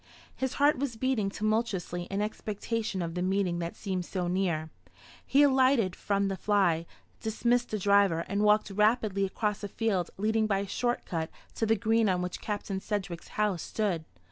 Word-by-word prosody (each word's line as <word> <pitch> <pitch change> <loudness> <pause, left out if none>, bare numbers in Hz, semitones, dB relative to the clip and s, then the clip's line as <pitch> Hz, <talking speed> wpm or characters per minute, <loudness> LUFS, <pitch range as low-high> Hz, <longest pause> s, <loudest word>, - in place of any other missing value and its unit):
His 265 -1 -2
heart 285 -1 +3
was 270 -4 -2
beating 225 -4 0
tumultuously 205 -5 -1
in 195 +2 -2
expectation 215 -1 -3
of 165 -1 -4
the 180 - -2
meeting 185 -2 +1
that 170 0 -4
seemed 190 -3 -3
so 180 0 -3
near. 175 -4 -1 0.5
He 280 +2 +4
alighted 260 -8 +4
from 200 -1 0
the 195 - -1
fly, 185 -5 +2 0.3
dismissed 240 +2 +1
the 215 - -1
driver, 200 -4 +3
and 200 +1 -1
walked 210 0 +3
rapidly 210 -1 +2
across 210 +2 -2
a - - -2
field 195 -4 -1
leading 220 +2 +1
by 200 -2 +2
a 200 +1 -2
short 240 +4 -1
cut 165 -1 -3 0.2
to 225 - -1
the 225 - +4
green 225 0 +2
on 180 -1 +1
which 180 - -5
Captain 205 -2 -3
Sedgewick's 190 -4 -4
house 210 -5 +1
stood. 195 -7 -1
205 Hz, 175 wpm, -29 LUFS, 185-220 Hz, 0.5 s, He